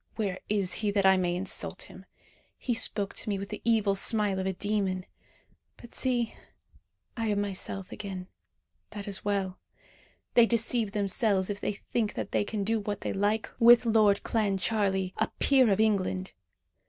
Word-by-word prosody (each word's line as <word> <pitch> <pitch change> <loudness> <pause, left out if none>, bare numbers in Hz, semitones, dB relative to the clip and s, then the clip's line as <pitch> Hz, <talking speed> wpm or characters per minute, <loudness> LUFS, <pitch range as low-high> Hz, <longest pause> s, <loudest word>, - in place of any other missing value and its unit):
Where 195 -4 -2
is 200 -3 +1
he, 210 - +1
that 200 -1 +1
I 190 0 +6
may 175 -2 0
insult 185 +2 -4
him? - - -14 0.5
He 245 - -2
spoke 205 -3 +4
to 220 - -2
me 200 - 0
with 195 +1 -6
the 210 - -6
evil 220 -3 +2
smile 200 -1 +2
of 190 - -2
a 190 - -1
demon. 195 -2 -2 0.7
But 240 - -14
see 245 -3 0 0.8
I 225 -1 -2
am 205 -1 0
myself 195 -1 -4
again. 190 -3 -6 0.6
That 205 -1 -8
is 200 -1 -2
well. 195 -2 -2 0.7
They 235 -1 +6
deceive 230 -2 0
themselves 200 -1 0
if 200 - -5
they - - -1
think 210 +1 -3
that - - -4
they - - +1
can 205 0 -3
do 225 +2 0
what 205 -1 -4
they - - -3
like 205 +2 0
with 240 0 +7
Lord 215 -3 +3
Clancharlie, 195 -3 0
a - - +1
peer 265 -4 +5
of 195 - +1
England. 190 -3 0
205 Hz, 170 wpm, -28 LUFS, 195-220 Hz, 0.8 s, with